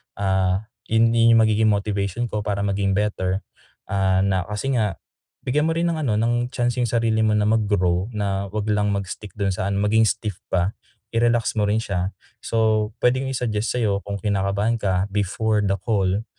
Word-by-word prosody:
ah, 95 0 +1 0.2
yung 115 +1 +3
din 115 0 +5
magiging 110 -1 +4
motivation 100 +2 -1
ko 105 - -1
para 100 -1 -1
maging 100 -1 0
better, 100 -2 -1 0.5
ah, 95 -1 +2
na 95 -2 0
kasi 105 +6 -2
nga 105 -6 0 0.5
bigyan 150 +4 +1
mo - - +1
rin 170 - +1
ng 165 -2 -2
ano, 120 -8 0
ng 120 +2 0
chance 120 -1 -1
yung 120 - 0
sarili 115 -1 +1
mo 110 - +2
na 105 - +2
mag 110 0 +2
grow, 90 0 +1
na 100 -2 -2
'wag 105 0 -2
lang 105 -1 +1
mag-stick 100 +1 -5
dun 100 -2 0
sa 95 +1 -2
ano, 100 - -1
maging 110 +2 +3
stiff 105 -3 -2
pa, 95 +2 +1 0.4
i-relax 120 0 +2
mo 105 - +2
rin 105 - +2
siya. 95 -4 -2 0.3
So, 110 -2 +1
puwedeng 130 +2 +1
i-suggest 120 -3 -1
sa'yo 100 -4 0
kung 100 0 -4
kinakabahan 100 +2 0
ka 95 -1 +1
before 105 +2 0
the 100 -1 +1
call, 100 +1 0
105 Hz, 185 wpm, -22 LUFS, 100-115 Hz, 0.5 s, din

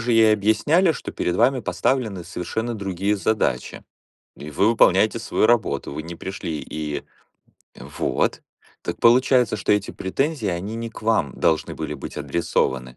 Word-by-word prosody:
же 120 +1 0
ей 110 -1 +6
объясняли, 145 - +3
что - - -7
перед 90 - -2
вами 125 +6 +3
поставлены 115 -7 -1
совершенно 110 +8 -4
другие 100 0 -1
задачи. 110 +4 -1 0.5
И 75 - -8
вы 95 +9 +2
выполняете 110 0 +4
свою 110 -1 +1
работу. 110 -14 +1
Вы 80 - -5
не 85 - -7
пришли 85 -3 -5
и 75 -2 -5 0.7
Вот. - - -2 0.4
Так - - -4
получается, 125 -1 +4
что - - -2
эти 105 -1 0
претензии, 135 +4 -2
они 95 +5 -3
не 115 0 -5
к 115 - -12
вам 110 - +1
должны 80 -1 +1
были - - -4
быть - - -8
адресованы? 65 -7 -1
105 Hz, 155 wpm, -22 LUFS, 85-115 Hz, 0.7 s, ей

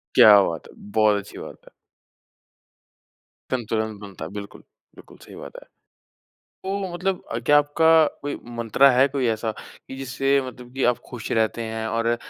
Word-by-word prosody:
क्या 105 -2 +8
बात 85 -5 -3
है, - - -16
बहुत 105 0 +1
अच्छी 100 0 -9
बात - - -9
है। - - -17 1.8
संतुलन 110 -3 -2
बनता 100 -6 -9
है, 80 - -9
बिल्कुल, 100 0 -9 0.3
बिल्कुल, - - -16
सही - - -14
बात - - -10
है। - - -28 1.0
तो 195 -1 -3
मतलब 180 +1 -2
अ, 115 - -1
क्या 135 +5 +3
आपका 160 +2 +4 0.2
कोई 145 0 -3 0.2
मंत्रा 115 +4 +4
है 130 +1 +4
कोई 135 -2 -1
ऐसा, 110 0 -1
कि 130 +4 -13
जिससे 135 +1 0
मतलब 125 -1 -11
कि 135 - -1
आप 120 - -4
खुश 120 -4 -7
रहते 110 +1 0
हैं 110 0 -4
और 115 +1 0
120 Hz, 165 wpm, -23 LUFS, 110-140 Hz, 1.8 s, क्या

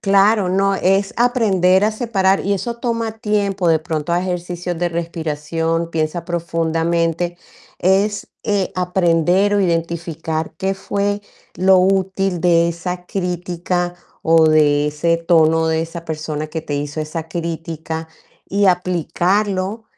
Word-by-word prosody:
Claro. 200 -1 +3
No, 195 +2 +2
es 195 +1 +1
aprender 205 -6 +3
a 215 - +2
separar, 195 -4 +1
y 200 - +1
eso 235 +4 -4
toma 230 -2 -2
tiempo. 200 -4 0
De 160 -1 +4
pronto, 155 0 -3
haz 175 +1 +1
ejercicios 175 -1 -3
de 175 +1 0
respiración, 165 0 -2
piensa 160 +1 -2
profundamente. 165 0 -1 0.4
Es, 200 +2 +1 0.2
eh, 205 -3 0
aprender 180 +2 +2
o 205 - +3
identificar 165 -2 -2
qué 195 +1 -1
fue 205 +1 -2 0.3
lo 190 +1 +4
útil 190 -1 +1
de 170 -1 +4
esa 180 +1 -5
crítica, 180 -1 -2 0.3
o 165 0 +5
de 150 -1 +4
ese 165 +3 +1
tono 165 -1 +3
de 160 0 +1
esa 165 +1 -7
persona, 155 -1 -4
que 160 +1 -4
te 155 -2 -5
hizo 145 +2 -3
esa 160 +1 -5
crítica, 165 -1 -4 0.4
y 200 +1 +2
aplicarlo 185 +4 0
175 Hz, 130 wpm, -19 LUFS, 165-195 Hz, 0.4 s, o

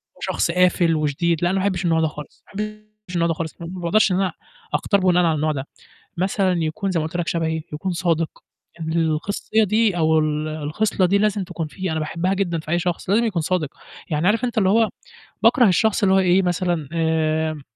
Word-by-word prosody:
وهو - - -22
شخص 170 - 0
قافل 180 -2 +3
وشديد، 155 +3 0
لأ، 175 - +3
أنا 190 - 0
ما - - -1
أحبش 190 -2 -1
النوع 165 -1 +2
ده 160 - +2
خالص، 150 -1 -10
ما - - -23
أحبش 215 -2 -7
النوع 170 -1 +2
ده 165 - +1
خالص، 160 0 -5
ما 165 - -5
باقدرش 185 +3 +1
إن - - +2
أنا 190 -1 0 0.4
أختار 200 - +2
بناءً 180 -1 +3
على 160 -2 +2
النوع 155 +1 0
ده، 140 -1 -4 0.5
مثلًا 190 0 +1
يكون 190 +5 -2
زَي 175 - 0
ما 155 - -1
قُلت 165 +2 -4
لك 170 - -2
شبهي، 160 -1 -1
يكون 185 +5 -3
صادق، 170 -2 0 0.5
الخصية 165 +7 0
دي 215 -2 +2
أو 160 -1 +3
ال 155 0 -1
الخصلة 155 +7 0
دي 195 +3 +3
لازم 205 -1 +1
تكون 175 -3 -5
فيه، 185 +3 -4
أنا 160 - -1
باحبها 170 +5 -1
جدًا 175 -4 -1
في 155 0 -7
أي 175 - +2
شخص، 175 0 -3
لازم 215 +4 +3
يكون 195 -7 0
صادق، 160 -3 -1 0.4
يعني 155 +2 0
عارف 225 +5 +2
أنت 240 - -4
اللي 190 -3 +3
هو 225 +1 +3 0.5
باكره 245 -5 +5
الشخص 205 +4 +2
اللي 190 -1 +4
هو - - +5
إيه 185 0 +4
مثلًا 175 -4 -1
آمم، 160 -2 0
175 Hz, 215 wpm, -22 LUFS, 160-195 Hz, 0.5 s, باكره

